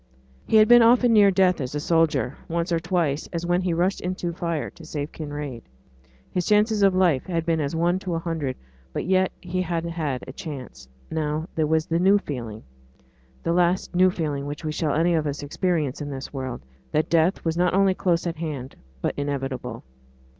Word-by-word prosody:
He - - +1
had 215 0 +7
been 240 +1 +8
often 240 +1 +5
near 205 -2 +7
death 185 -4 +3
as 130 +2 -4
a - - 0
soldier; 150 -5 +1
once 170 +2 -2
or 165 - +2
twice, 165 -4 -1
as 170 0 -3
when 175 +1 +2
he 180 -1 0
rushed 180 +4 0
into 180 -1 -3
fire 170 -2 -3
to 170 - -15
save 150 -2 -5
Kinraid, 145 -5 -6 0.7
his 180 -2 -1
chances 210 0 +3
of 195 -2 +4
life 175 -8 +2
had 165 -3 -1
been 165 -1 +1
as 145 +1 -2
one 175 +3 +1
to 180 -3 -3
a - - 0
hundred; 160 -6 -3 0.4
but - - -3
yet 185 +1 +2
he 185 +1 -2
had 170 -2 -2
had 155 -6 -3
a 130 - -9
chance. 135 - -8 0.2
But - - -7
now 155 +1 -1
there 155 -1 +1
was 160 0 +2
the 165 0 0
new 195 +3 +5
feeling 120 - -6 0.8
the 170 - +1
last 180 +1 +1
new 185 +1 +5
feeling 150 -6 -3
which 145 +2 -6
we 155 - -1
shall 150 -1 -1
any 170 +3 +3
of 155 -2 +1
us 145 0 -4
experience 150 -2 -1
in 145 - -4
this 135 0 -6
world 130 -3 -4 0.3
that 155 - +1
death 170 +3 +2
was 165 0 0
not 180 +1 +2
only 195 -1 +4
close 175 -2 0
at 170 -1 -3
hand, 145 -5 -5 0.3
but - - 0
inevitable. 135 -4 -3
165 Hz, 205 wpm, -24 LUFS, 145-180 Hz, 0.8 s, been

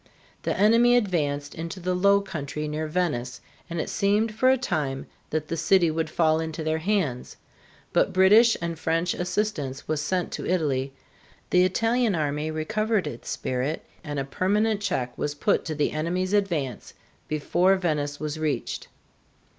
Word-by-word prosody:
The - - -2
enemy 230 +4 +5
advanced 145 -9 -1
into 165 +3 -6
the 180 +1 -1
low 200 +2 +4
country 150 -5 -5
near 155 +1 -3
Venice, 150 -7 -1 0.3
and 170 0 -3
it - - -2
seemed 210 +2 +1
for 255 +4 +3
a 265 - +5
time 150 - -2 0.2
that 155 0 -2
the 165 - -2
city 170 0 +3
would 160 0 -2
fall 160 -1 +2
into 160 0 -4
their 155 0 0
hands. 160 -9 -1 0.6
But - - +3
British 210 +5 +6
and 170 -1 -3
French 165 +3 0
assistance 175 -7 -2
was 155 -1 -1
sent 180 +3 -1
to - - -4
Italy, 140 -7 0 0.6
the 180 0 +5
Italian 225 +3 +1
army 150 0 -1
recovered 215 +7 0
its 120 - -7
spirit, 130 +5 -2 0.2
and 145 -3 -5
a 135 - -1
permanent 205 +8 +1
check 125 -11 -2
was 145 0 -2
put 200 +8 +1
to 155 - -3
the 150 - +1
enemy's 180 +5 -1
advance 165 - -1 0.3
before 175 +5 +2
Venice 150 -6 -1
was 155 0 -4
reached. 150 -6 -2
165 Hz, 160 wpm, -26 LUFS, 150-195 Hz, 0.6 s, British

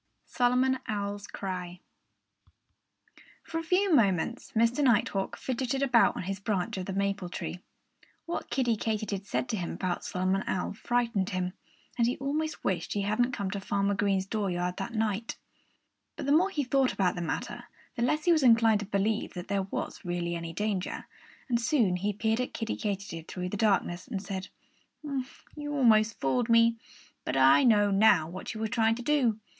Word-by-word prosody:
V - - -27
SOLOMON 255 +1 +2
OWL'S 205 -1 -3
CRY 180 -2 -5 1.6
For 325 - -4
a - - -5
few 365 +2 +2
moments 215 - +2
Mr. 230 +6 +3
Nighthawk 205 -6 +1
fidgeted 260 +1 -2
about 250 -4 +4
on - - -4
his 195 +1 -4
branch 195 -4 -1
of 185 - -4
the 195 - -3
maple 200 -2 -1
tree. 180 - -5 0.7
What 340 - -4
Kiddie 245 -4 +1
Katydid 210 -3 -2
said 255 - -1
to 220 - -1
him 175 -3 -3
about 180 -2 -2
Solomon 185 +1 0
Owl 185 - -1
frightened 230 -3 0
him. 185 -1 -2 0.5
And 235 - +4
he 245 - -1
almost 305 +3 -2
wished 175 -3 -1
he 205 - -1
hadn't 240 +5 +1
come 200 -4 -2
to 200 - -3
Farmer 200 0 0
Green's 195 -1 +1
dooryard 180 -4 -2
that 200 +4 -5
night. 220 0 -1 0.8
But - - -5
the 280 - +1
more 345 +6 +4
he 300 -7 -1
thought 265 0 +2
about 185 -2 +1
the 175 - -5
matter, 165 - -4 0.3
the - - -4
less 300 +6 +1
he 350 - +5
was 320 -2 +4
inclined 230 -4 +5
to 205 - -5
believe 210 +2 -1
that 175 0 -7
there 195 -1 0
was - - -4
really 175 -1 -2
any 170 0 -5
danger. 200 +1 -2 0.4
And 235 -2 +1
soon 230 - +2
he 200 +3 -1
peered 220 +3 0
at 250 - -4
Kiddie 225 - -2
Katydid 195 -6 -4
through 180 -1 -4
the 205 - -4
darkness 195 -4 +1
and 205 -5 -3
said: 190 -1 -5 1.1
"You 295 -1 -4
almost 225 -5 +4
fooled 230 - 0
me. 230 0 +5 0.5
But - - -2
I 135 - +6
know 205 -4 +4
now 195 -5 +5
what 185 +6 -7
you - - -5
were 220 - 0
trying 225 +1 +2
to 245 - -7
do. 245 -6 +2
210 Hz, 180 wpm, -29 LUFS, 190-245 Hz, 1.6 s, I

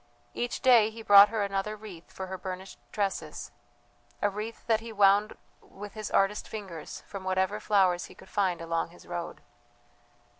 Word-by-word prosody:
Each 240 0 -3
day 240 -5 +6
he 225 0 -10
brought 205 -1 +9
her 220 -1 -1
another 200 +1 -2
wreath 205 -6 -12
for 190 - -6
her 190 0 -6
burnished 185 0 -7
tresses 200 -2 -3 0.7
a 205 - +1
wreath 215 +3 -6
that 225 -2 +2
he 230 0 -9
wound 205 0 +3 0.2
with 205 +1 -11
his 215 -1 -5
artist 195 +2 +1
fingers 190 -8 -7
from 195 -2 -8
whatever 190 +2 0
flowers 190 -4 +2
he - - -14
could - - -15
find 185 -5 0
along 165 0 -1
his 175 - -17
road. 175 -1 -6
200 Hz, 165 wpm, -29 LUFS, 185-215 Hz, 0.7 s, brought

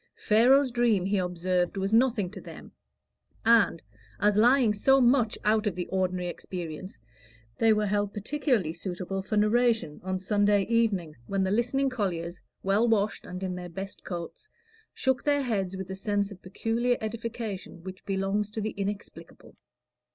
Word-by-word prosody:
Pharaoh's 255 +5 +4
dream, 235 -6 +2
he 200 0 +1
observed, 180 +1 -1
was 195 +2 -1
nothing 225 -6 +3
to - - -9
them; - - -11 0.7
and, 225 -7 +4 0.4
as 205 0 +3
lying 240 +1 +5
so 270 +6 +4
much 245 -3 +3
out 215 +1 +3
of 185 -3 -2
ordinary 185 -1 -1
experience, 175 -1 -6 0.6
they 225 -1 +5
were 210 -1 +2
held 205 0 0
particularly 220 - 0
suitable 185 +2 -4
for 210 +3 -2
narration 220 -6 +2
on 185 0 -2
Sunday 205 +1 +2
evenings, 200 - 0
when 195 -1 0
the 190 - 0
listening 250 +5 +1
colliers, 180 -7 -3 0.2
well 200 +5 +3
washed 210 -2 0
and 180 +1 -6
in 185 -1 -2
their 180 0 -6
best 195 +3 -7
coats, 175 - -7 0.4
shook 265 -1 0
their 285 -1 +2
heads 195 -6 -2
with 190 0 -6
a - - -4
sense 205 +1 -1
of 185 - -11
peculiar 230 +6 0
edification 220 -5 -5
which 185 0 -9
belongs 195 +1 -1
to 210 - -5
the 215 0 -2
inexplicable. 200 +1 -7
205 Hz, 155 wpm, -28 LUFS, 185-230 Hz, 0.7 s, lying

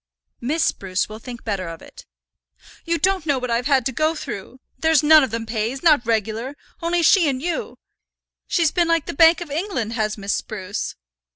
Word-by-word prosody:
"Miss 300 +7 0
Spruce 185 -1 -1
will 215 +1 -9
think 240 0 -9
better 195 -5 -3
of 165 -1 -7
it." - - -15 0.8
"You 335 0 0
don't 375 -2 0
know 285 -2 +2
what 250 -1 -3
I've 240 +2 0
had 270 -4 +3
to 265 - 0
go 310 +6 0
through. 255 -3 -7 0.2
There's 320 -2 +3
none 310 0 +7
of 265 - -1
them 225 +1 -4
pays, 225 +5 -3
not 300 -8 +4
regular, 225 +4 -1 0.3
only 340 0 +1
she 340 -2 +5
and 260 -2 -2
you. 335 +4 -4 0.7
She's 330 -4 +2
been 345 -2 +1
like 330 -2 +1
the - - -5
Bank 325 +3 +5
of 335 -4 -7
England, 290 - -2
has 215 -2 -1
Miss 200 0 -2
Spruce." 200 -2 -4
265 Hz, 195 wpm, -22 LUFS, 220-325 Hz, 0.8 s, none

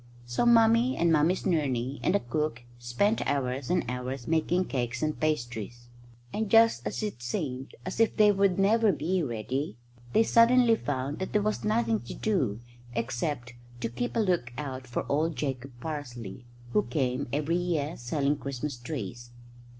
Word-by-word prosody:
So 120 - 0
Mummy 230 +2 +5
and 170 0 +3
Mummy's 160 +4 +3
nurney 140 - 0
and 180 - +2
the - - +4
cook 125 -2 -2 0.2
spent 160 - +1
hours 130 -2 -1
and 180 -1 +1
hours 125 +1 -4
making 165 +3 +1
cakes 120 -4 -2
and 155 0 -1
pastries; 120 -5 -3 0.4
and 220 -1 -1
just 225 +1 +5
as - - -3
it 205 - -4
seemed 130 - -4
as 185 +4 -5
if 225 - +3
they 210 -1 +7
would 195 -2 +2
never 215 +2 +4
be 180 +3 0
ready, 125 -1 -3 0.4
they 225 - +5
suddenly 235 +1 +5
found 135 - -3
that 190 - -4
there 210 - +3
was 215 0 -1
nothing 220 +1 +1
to - - -8
do 170 - 0 0.3
except 120 +1 -2 0.3
to - - -1
keep 240 - -3
a - - +2
lookout 130 - -2
for 120 - -3
old 155 +3 +1
Jacob 135 -2 -3
Parsley, 125 -7 -6 0.3
who 210 - +4
came 135 -7 -1
every 150 +4 0
year 165 -3 -1
selling 140 +4 0
Christmas 140 0 -4
trees. 120 -2 -6
150 Hz, 160 wpm, -28 LUFS, 125-195 Hz, 0.4 s, they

